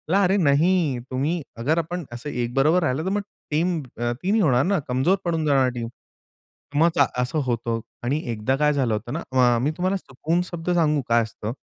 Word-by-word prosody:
अरे 195 -1 +4
नाही, 155 -2 +2
तुम्ही 150 +7 -1 0.2
अगर 150 +7 +1
आपण 170 +1 -2
असं 120 +5 -6
एकबरोबर 135 +8 +1
राहिलो 145 +1 0
तर 190 - 0
मग 205 - 0 0.3
टीम 170 +3 +1
ती 120 +11 -3
नाही 220 - +3
होणार 130 -7 +3
ना, 195 -1 +2
कमजोर 130 +10 +2
पडून 165 -2 0
जाणार 135 -3 +3
टीम. 115 -1 -3 0.9
मग 165 +2 +5
चा 140 - +5 0.2
असं 125 +5 -1
होतं 115 -1 -1 0.2
आणि 140 +5 0
एकदा 110 +4 0
काय 150 +1 +3
झालं 130 -5 +1
होतं 110 +4 -4
ना, 165 - -3
अ, 125 -2 +4
मी 145 +4 +1
तुम्हाला 185 +2 0
सुकून 160 +2 -2
शब्द 170 0 -4
सांगू 155 -4 +2
काय 115 0 +4
असतं? 110 +1 -6
145 Hz, 190 wpm, -23 LUFS, 125-170 Hz, 0.9 s, मग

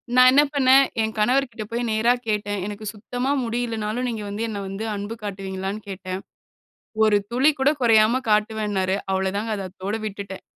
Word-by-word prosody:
நா 255 - +7
என்ன 285 +2 +6
பண்ணேன், 270 -1 +6 0.2
என் 220 0 -1
கணவர் 255 +5 +3
கிட்ட 225 -2 -6
போய் 235 +1 -1
நேரா 225 +3 +3
கேட்டேன். 205 -2 -1
எனக்கு 210 +1 -7
சுத்தமா 245 +5 -3
முடியில்லைன்னாலும் 230 0 -2
நீங்க 220 -3 -4
வந்து 210 +3 -3
என்ன 205 -2 -4
வந்து 195 +3 -5
அன்பு 205 +3 -5
காட்டுவீங்களான்னு 195 0 -4
கேட்டேன். 185 -1 -5 0.8
ஒரு 210 -1 +5
துளி 260 +5 +4
கூட 265 +2 +4
கொறையாம 230 +1 +4
காட்டுவேன்னாரு. 210 -3 +1 0.2
அவ்வளோ 190 0 0
தாங்க, 220 +2 -2
அத 195 -1 -4
அத்தோட 195 +3 -4
விட்டுட்டேன். 200 -2 -6
215 Hz, 165 wpm, -23 LUFS, 200-235 Hz, 0.8 s, நா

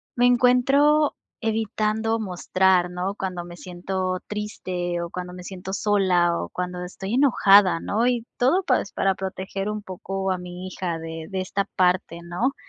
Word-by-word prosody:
me 245 - +3
encuentro, 270 +5 +4 0.2
evitando 220 0 0
mostrar, 185 -2 +2
¿no?, 185 +3 -3
cuando 180 -3 -4
me 175 0 -10
siento 185 +1 -3
triste, 180 -4 -3
o 170 - -4
cuando 180 0 -6
me 180 0 -9
siento 190 0 -7
sola, 185 -5 +2
o - - -4
cuando 180 0 -4
estoy 190 +4 -6
enojada, 200 -9 +5
¿no? 225 +3 0
Y, 245 -2 +1
todo, 305 +10 +3
pues, 255 - +1
para 195 0 +1
proteger 190 +1 -4
un 210 0 -3
poco, 195 0 -4
a 185 - 0
mi 180 +1 -7
hija, 175 -3 -3
de 160 0 -7
de 190 -1 -3
esta 195 +1 -1
parte, 180 -2 +1
¿no? 180 +11 -1
190 Hz, 160 wpm, -24 LUFS, 180-215 Hz, 0.2 s, enojada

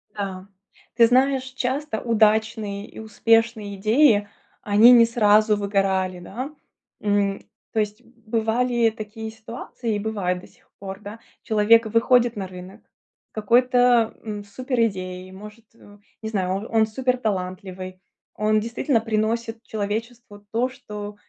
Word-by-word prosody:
Да. 195 -2 -5 0.5
Ты 230 -1 +6
знаешь, 260 +2 +3
часто 260 -1 -3
удачные 215 -2 +1
и - - -12
успешные 220 -1 +1
идеи, 215 +1 +3 0.3
они 210 +4 +6
не 235 -2 +8
сразу 215 -2 +3
выгорали, 195 -2 0
да. 255 - -7 0.5
М, 205 -1 0 0.3
то 220 - 0
есть 210 +2 -2
бывали 230 +1 0
такие 220 0 -7
ситуации 225 0 -6
и - - -2
бывают 200 -4 -2
до - - -14
сих - - -28
пор, 195 0 -7
да. 210 +2 -9 0.2
Человек 225 +1 +4
выходит 235 +2 +3
на 195 -2 -4
рынок, 185 +3 -11 0.5
какой-то, 245 +1 +3
м, 210 -2 -5
супер 255 +5 -4
идеей, 185 -2 -7
может, 210 +4 -12
э, 205 -2 -17 0.2
не 220 - -4
знаю, 190 -4 -1
он 200 +4 -4
он 220 -1 +3
супер 255 +3 -1
талантливый. 185 -3 -4 0.4
Он 215 +1 +2
действительно 230 +3 0
приносит 225 +1 -2
человечеству 220 0 -5
то, 240 +3 0
что, 210 -5 -8
220 Hz, 130 wpm, -23 LUFS, 205-235 Hz, 0.5 s, не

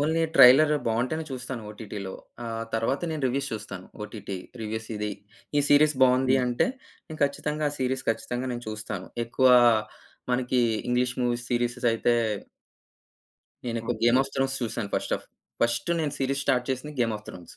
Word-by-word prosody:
Only 160 +3 +1
trailer 145 +3 +8
బావుంటేనే 125 +8 0
చూస్తాను 125 -2 -5
ఓటీటీలో. 105 -2 -7 0.3
ఆహ్, 115 -1 -3
తరువాత 115 +5 0
నేను 155 -3 -4
రివ్యూస్ 135 +2 -1
చూస్తాను. 100 -4 -6 0.2
OTT 105 -2 -6 0.3
reviews. 110 0 -4
"ఇది 105 0 -2 0.5
ఈ - - +5
సీరీస్ 150 +1 +5
బావుంది" 130 +1 +5
అంటే 120 - +1 0.4
నేను 155 -1 -9
ఖచ్చితంగా 150 +2 -2
ఆ - - -8
సీరీస్ 130 0 -1
ఖచ్చితంగా 125 +3 -3
నేను 120 0 -6
చూస్తాను. 105 -3 -5 0.2
ఎక్కువ 130 +3 +2 0.9
మనకి 125 0 +1 0.3
ఇంగ్లీష్ 125 0 +1
మూవీస్, 120 0 -1
సీరీస్ 120 0 0
అయితే 120 +1 +2 1.5
నేనొక 115 0 -2
'గేమ్ 120 +2 +5
ఆఫ్ 135 - -7
థ్రోన్స్' 135 0 0
చూసాను 115 -3 -3
ఫస్ట్ - - 0
ఆఫ్ - - -18 0.4
ఫస్ట్ 120 +7 +1
నేను 145 -2 -2
సీరీస్ 135 +1 0
స్టార్ట్ 125 -2 +1
చేసింది 140 +4 -4
'గేమ్ 115 -2 +1
ఆఫ్ 105 - -19
థ్రోన్స్'. 90 -2 -11
125 Hz, 155 wpm, -26 LUFS, 115-135 Hz, 1.5 s, trailer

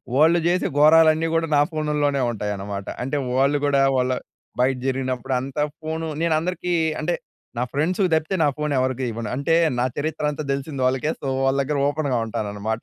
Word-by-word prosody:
వాళ్ళు 160 +4 +5
చేసే 180 +1 +1
ఘోరాలన్నీ 160 +1 +6
గూడా 165 0 +1
నా - - +5
ఫోనులోనే 150 -3 0
ఉంటాయన్నమాట. 100 -2 -4 0.2
అంటే, 135 +3 -2 0.2
వాళ్ళు 140 +2 +3
గూడా 140 -1 +3 0.2
వాళ్ళ 125 0 +1 0.5
బయట 130 +1 +3
జరిగినప్పుడు 130 0 -2
అంతా 135 +3 -2 0.2
ఫోన్ 160 +1 -3 0.2
నేను 165 -1 +2
అందరికీ 180 +1 -2 0.3
అంటే, 170 +3 0 0.4
నా 120 - +1
ఫ్రెండ్స్‌కి 180 +6 +1
తప్పితే 160 +4 -1
నా 145 - +4
ఫోన్ 150 -1 -1
ఎవరికీ 130 0 -1
ఇవ్వను. 115 -1 -5
అంటే, 140 +5 +1 0.2
నా 125 - +2
చరిత్ర 155 +1 -3
అంతా 150 +1 -5
తెలిసింది 140 -1 -4
వాళ్ళకే. 135 +4 0
సో, 140 - -4 0.2
వాళ్ళ 135 +1 +2
దగ్గర 145 +1 -2
ఓపెన్‌గా 145 -4 -1
ఉంటాననమాట. 110 0 -3
145 Hz, 170 wpm, -23 LUFS, 130-155 Hz, 0.5 s, ఘోరాలన్నీ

